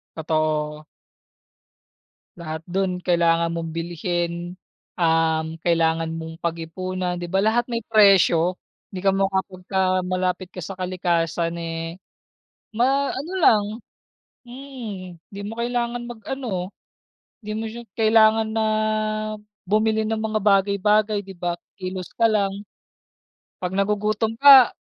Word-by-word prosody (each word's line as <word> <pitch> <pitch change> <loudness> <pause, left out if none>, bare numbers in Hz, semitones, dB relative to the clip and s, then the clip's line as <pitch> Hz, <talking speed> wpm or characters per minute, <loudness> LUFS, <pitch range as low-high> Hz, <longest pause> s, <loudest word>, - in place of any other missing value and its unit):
Totoo. 155 -1 -1 1.5
Lahat 160 -2 -5
dun 185 0 -1
kailangan 170 -2 +2
mong 165 -1 -4
bilhin, 175 +1 -3 0.4
um, 160 -1 +2
kailangan 165 -1 +1
mong 160 0 -7
pag-ipunan 180 +2 -3
di 175 0 -6
ba 190 - +2
lahat 220 +4 +2
may 230 - 0
presyo? 190 -5 +5 0.3
Hindi 185 - -5
ka - - +6
makapunta 190 -1 0
malapit 185 0 -2
ka 180 - -8
sa 190 +3 -6
kalikasan 170 -2 -1
eh, 165 0 -5 0.8
ma 270 +5 +2
ano 295 +7 -5
lang 210 -2 +5 0.8
mm 240 -8 -8 0.2
di 200 - -8
mo 225 - -6
kailangan 240 0 -2
mag-ano, 255 +3 -6 0.9
di 215 0 -5
mo 225 - -3
siya 230 +2 -6 0.2
kailangan 220 0 +4
na 220 0 +1 1.0
bumili 215 +2 +2
ng 220 0 -1
mga 220 0 -1
bagay-bagay 205 +1 +2
di 195 - -9
ba, 175 -1 -3 0.2
kilos 185 -2 -6
ka 230 - +3
lang, 200 -3 +1 1.1
'pag 185 +1 -3
nagugutom 210 +2 0
ka, 270 -4 +9
185 Hz, 115 wpm, -23 LUFS, 170-215 Hz, 1.5 s, ka